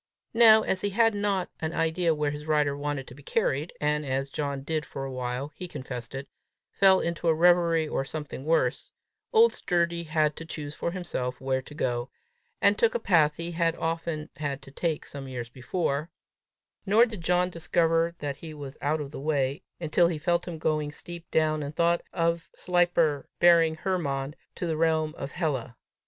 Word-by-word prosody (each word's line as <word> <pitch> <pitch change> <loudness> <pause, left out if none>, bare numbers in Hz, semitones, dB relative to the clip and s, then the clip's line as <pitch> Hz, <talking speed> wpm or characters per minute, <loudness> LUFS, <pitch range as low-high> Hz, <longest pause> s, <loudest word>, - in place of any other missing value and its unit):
Now 220 -2 +8
as 185 - 0
he 205 - 0
had 225 +2 +3
not 200 -3 -1
an 160 +1 -3
idea 165 0 +1
where 150 -1 0
his 150 +1 -7
rider 150 -2 +2
wanted 145 -1 -3
to - - -10
be 140 - -14
carried, 140 +3 0
and 150 0 +1
as 135 0 -2
John 140 -2 -3
did 155 +1 -1
for 135 0 -6
a 135 - -5
while 130 +2 -3
he 180 +3 -7
confessed 130 -5 -6
it 135 +1 -5 0.4
fall 190 -1 +5
into 170 0 -2
a 160 - +4
reverie 170 -1 +4
or 135 - -1
something 145 -1 -6
worse, 160 +3 +1 0.4
old 460 0 +6
Sturdy 170 -1 0
had 155 -2 +1
to - - -6
choose 150 -2 -6
for 170 - -2
himself 160 -8 -3
where 130 0 0
to 145 +3 -13
go, 120 -2 -1 0.5
and - - +4
took 475 0 +3
a - - +2
path 155 - +3
he 170 +2 -4
had 165 -1 +1
often 165 -2 -3
had 140 -2 -3
to 135 - -13
take 160 +2 -2
some 140 -1 -8
years 120 -3 -5
before; 140 +4 -2 0.7
nor 215 +4 +5
did 215 -6 -7
John 180 +1 +2
discover 165 0 +1
that 145 -3 -4
he 155 -1 -9
was 140 -2 -8
out 150 +2 0
of 140 -1 -6
the 145 - -7
way, 140 -2 0 0.2
until 170 +1 +3
he 170 -2 -2
felt 170 +3 0
him 170 -2 -5
going 155 -1 0
steep 170 +2 -9
clown, 155 -1 +2
and 145 +1 -5
thought 170 0 +2
of 170 -1 0
Sleipner 175 -5 +1
bearing 165 -2 +6
Hermod 150 -5 -2 0.2
to - - -3
the 160 -2 -1
realm 160 -1 +1
of 135 - -6
Hela. 135 -9 -2
155 Hz, 190 wpm, -27 LUFS, 140-170 Hz, 0.7 s, Now